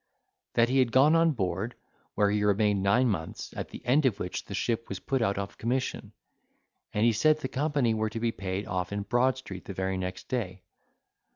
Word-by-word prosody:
That 115 0 +5
he 135 +1 +3
had 125 -3 +3
gone 140 +6 +5
on 165 -1 +4
board, 95 +1 -2 0.4
where 100 -1 +3
he 105 0 +1
remained 105 -1 +2
nine 115 +7 +3
months, 80 -8 -3
at - - -5
the - - -10
end 135 +3 +4
of 110 -6 -1
which 90 - -4
the 100 - -6
ship 115 +3 -1
was 95 - -4
put 135 -2 -1
out 100 -3 +1
of 100 0 -5
commission, 125 +3 -2 0.8
and 105 +2 +1
he 120 - +5
said 155 +8 +4
the 150 - -4
company 140 -3 +1
were 110 0 0
to 115 - -5
be 115 0 +1
paid 95 -1 -4
off 90 0 -3
in 100 0 -2
Broad 120 +5 +2
Street 95 -8 -8
the 100 - -7
very 95 0 -1
next 90 0 -5
day. 95 -8 -3
110 Hz, 210 wpm, -28 LUFS, 95-130 Hz, 0.8 s, That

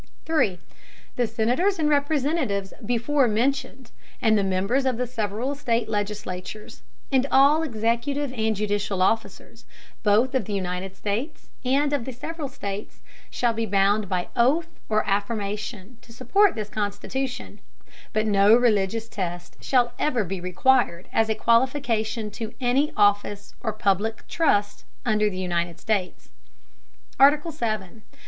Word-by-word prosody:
The 245 - -2
Senators 245 - +1
and 310 -2 +1
Representatives 285 - 0
before 245 +4 +2
mentioned, 250 +2 -1 0.3
and 220 -1 +3
the 205 - +2
Members 195 +8 +1
of 255 -3 0
the 250 - -1
several 230 +2 -2
State 240 -6 -1
Legislatures, 205 -1 -5 0.3
and 265 0 +3
all 285 +4 +5
executive 255 +2 -1
and 220 -2 0
judicial 205 -2 -1
Officers, 225 +4 -2 0.4
both 220 +5 +3
of 260 - 0
the 210 - -3
United 185 0 -3
States 230 +10 -4
and 280 +3 +2
of 275 -5 -1
the 265 - -5
several 305 +4 -5
States, 205 -6 -7 0.3
shall 240 -2 0
be 225 0 -2
bound 200 +1 +2
by 180 -2 -1
Oath 310 +8 +1
or 215 -1 +1
Affirmation, 205 +2 -3
to 230 - -17
support 390 - +2
this 215 -2 -4
Constitution; 215 +3 -4 0.5
but 215 0 0
no 205 +1 +5
religious 225 -2 +1
Test 175 -5 -5
shall 245 -2 +2
ever 250 -7 +1
be 190 0 -5
required 185 0 +1
as 225 0 +2
a 220 - +1
Qualification 230 -3 +1
to 225 +1 -6
any 265 +4 +2
Office 205 0 +1
or 220 - -1
public 215 +1 -1
Trust 205 -11 +1 0.2
under 215 -2 +2
the 185 - -7
United 175 -2 -2
States. 200 -5 -2 0.9
ARTICLE. 295 +4 +5
VII. 220 - -4
225 Hz, 135 wpm, -24 LUFS, 205-260 Hz, 0.9 s, all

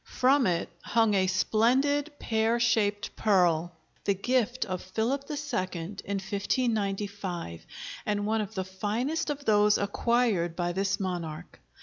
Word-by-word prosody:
From 265 0 +4
it 170 -2 0
hung 225 -2 +2
a 190 -1 +3
splendid 260 +10 +2
pear 225 0 +1
shaped 220 -3 +1
pearl, 175 -5 +2 0.3
the 200 - +1
gift 245 +4 0
of 185 -2 -4
Philip 230 +9 -2
II 300 - -3 0.4
in 195 +3 -5
1595, 200 - -2 0.4
and 205 -1 0
one 220 +1 +1
of 215 +1 -6
the 190 -1 -2
finest 220 +12 -2
of 290 -1 -4
those 210 -1 +4
acquired 200 -4 +1
by 175 0 -1
this 195 +2 0
monarch. 175 -5 -5
205 Hz, 130 wpm, -28 LUFS, 190-235 Hz, 0.4 s, From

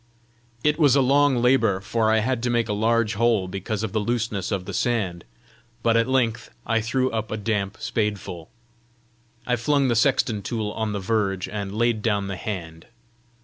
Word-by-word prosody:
It 150 +1 +2
was 145 -4 +5
a - - +5
long 135 -1 +3
labour, 115 -6 +3
for 110 +2 0
I 110 0 +3
had 125 +1 -1
to 125 - 0
make 120 -2 +1
a 105 - -1
large 110 +1 +1
hole 110 -3 +2
because 100 +3 -4
of 110 - -2
the 110 - 0
looseness 110 -3 -2
of 95 -3 -2
the - - -6
sand; 95 -8 -1 0.6
but 115 -1 +3
at 115 +1 +3
length 125 -4 0 0.2
I 115 -1 +1
threw 130 +3 0
up 110 0 -3
a 110 - -3
damp 105 -2 -2
spadeful. 100 -6 -3 1.0
I 125 - +1
flung 140 +2 +2
the 120 - +2
sexton 115 -3 +2
tool 110 0 -3
on 110 -1 -3
the 100 - -2
verge, 95 -2 -1
and 100 0 -5
laid 115 -1 +1
down 100 -2 0
the 95 - -3
hand. 85 -4 -6
110 Hz, 190 wpm, -24 LUFS, 100-120 Hz, 1.0 s, was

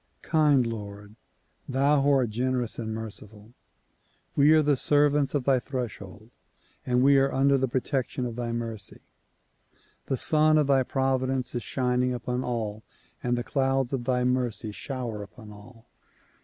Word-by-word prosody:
kind 150 -5 +3
Lord! 105 -2 -7 0.5
Thou 140 +2 +3
who 140 - +2
art 130 -5 +2
generous 125 +1 -1
and 110 -1 -4
merciful! 110 0 -8 0.8
We 145 +2 +5
are 155 -1 +5
the 145 -1 +3
sei 145 +3 +3
vants 145 -1 0
of 140 - 0
thy 130 -1 +3
threshold 110 -5 -7 0.6
and 125 0 +2
we 140 0 +6
are 135 0 +2
under 140 +1 +3
the 130 -1 +1
protection 130 0 -2
of 120 -2 -5
thy 120 -1 -3
mercy. 115 -3 -5 1.1
The 135 - -1
Sun 155 +3 +3
of 150 - +3
thy 135 -1 +3
providence 130 -1 -1
is 120 - -2
shining 125 0 0
upon 125 +1 -3
all 110 -3 -3 0.4
and 120 0 0
the 120 - -2
clouds 135 -1 0
of 125 -3 -2
thy 125 -1 +1
mercy 125 -4 -1
shower 120 -2 -5
upon 105 +2 -12
all. 110 +3 -15
125 Hz, 155 wpm, -27 LUFS, 115-135 Hz, 1.1 s, we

